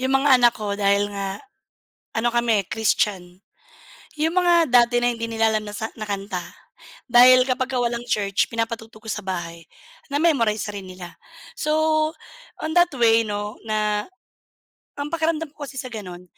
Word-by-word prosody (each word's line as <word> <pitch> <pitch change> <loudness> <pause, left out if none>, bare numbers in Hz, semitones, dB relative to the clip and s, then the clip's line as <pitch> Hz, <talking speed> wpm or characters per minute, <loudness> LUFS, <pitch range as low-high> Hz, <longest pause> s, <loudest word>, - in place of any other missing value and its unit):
yung 260 +1 0
mga 270 -1 +5
anak 240 -1 +6
ko 210 -2 -3
dahil 200 0 +2
nga 195 -1 -4 0.8
ano 230 +2 +1
kami, 235 -4 +2
eh, - - -29
Christian. 190 -5 -1 0.8
Yung 325 +2 +1
mga 345 -3 +4
dati 240 0 +4
na 240 - +2
hindi 230 0 -5
nila 225 0 +1
alam 215 -1 -1
na 205 - -7
sa 220 - -3
na 215 - -5
kanta 195 -2 -4 0.7
dahil 250 +1 +7
kapagka 255 0 -1
walang 240 0 -2
church 200 -2 0
pinapatugtog 225 -1 -4
ko - - -4
sa 210 - -6
bahay, 170 -3 -5 0.5
na-memorize 235 -10 +1
rin 200 -2 -7
nila. 185 -1 -10 0.4
So, 305 - -1 0.9
on 315 0 -3
that 350 -2 +4
way 230 -1 +4
'no, 205 0 -4
na 210 -1 -1 0.9
ang 285 +1 -3
pakiramdam 320 -2 -1
ko 295 - -6
kasi 270 - -11
sa 255 - -7
gano'n 180 -4 -8
225 Hz, 160 wpm, -22 LUFS, 205-255 Hz, 0.9 s, dahil